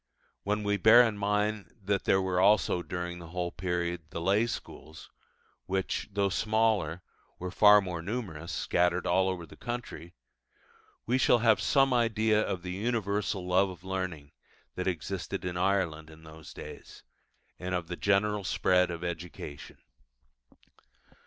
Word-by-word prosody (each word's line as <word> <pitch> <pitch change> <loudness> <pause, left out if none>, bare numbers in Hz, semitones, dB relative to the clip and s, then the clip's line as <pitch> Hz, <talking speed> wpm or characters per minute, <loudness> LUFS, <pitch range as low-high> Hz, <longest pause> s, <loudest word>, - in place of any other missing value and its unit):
When 105 +1 -1
we 105 0 +1
bear 110 +5 +8
in 115 -3 0
mind 105 +1 -1
that 100 0 -1
there 95 - +4
were 95 -1 0
also, 95 -2 +3
during 90 +1 -5
the 85 - -10
whole 90 +1 -3
period, 90 -1 -2
the 85 - -5
lay 100 +7 +2
schools, 80 -8 -8 0.6
which, 95 +2 -2
though 100 0 +1
smaller, 110 -4 0 0.3
were 90 0 -5
far 105 +1 +7
more 90 -3 -5
numerous 90 -5 -5
scattered 90 +2 +1
all 95 0 +2
over 90 -2 -4
the - - -15
country 120 -8 -7 0.9
we 125 +3 +1
shall 125 - +5
have 115 -2 +3
some 135 -2 +3
idea 110 -2 +2
of 90 -4 -3
the 90 - -5
universal 100 -2 -1
love 95 +2 +3
of 90 -1 -11
learning 95 -7 -4 0.4
that 90 - -4
existed 90 0 -3
in 90 -1 -3
Ireland 90 -4 0
in 80 0 -15
those 80 -2 -12
days, - - -11 0.6
and 90 0 -3
of 85 -2 -3
the 90 - -4
general 105 +2 +1
spread 90 0 +2
of 85 0 -5
education. 85 -4 -7
95 Hz, 150 wpm, -29 LUFS, 90-105 Hz, 0.9 s, bear